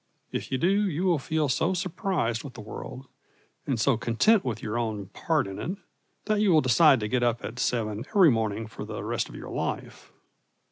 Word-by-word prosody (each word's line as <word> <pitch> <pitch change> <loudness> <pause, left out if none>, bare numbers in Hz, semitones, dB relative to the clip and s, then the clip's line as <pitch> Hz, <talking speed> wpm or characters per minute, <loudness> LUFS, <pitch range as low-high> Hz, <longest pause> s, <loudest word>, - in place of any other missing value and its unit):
If - - -4
you 130 - +1
do, 195 +6 +2
you 170 +2 -2
will 175 -5 +3
feel 155 +2 0
so 160 +8 +1
surprised 170 - -1
with 135 -4 -9
the - - -9
world, 125 +4 -8 0.6
and 130 -5 0
so 125 +1 +3
content 185 - +3
with 110 -4 -4
your 105 0 -3
own 110 -5 -2
part - - 0
in 95 0 -7
it, 185 +3 -3 0.5
that 215 -1 +1
you 205 -3 +4
will 160 - +6
decide 135 +1 +5
to 105 - -1
get 125 +3 0
up 120 -1 0
at 125 +2 -6
seven 110 -3 -1
every 190 -8 +6
morning 110 -1 -1
for 110 - -8
the - - -6
rest - - -2
of - - -11
your - - -8
life. - - -4
130 Hz, 205 wpm, -27 LUFS, 115-175 Hz, 0.6 s, will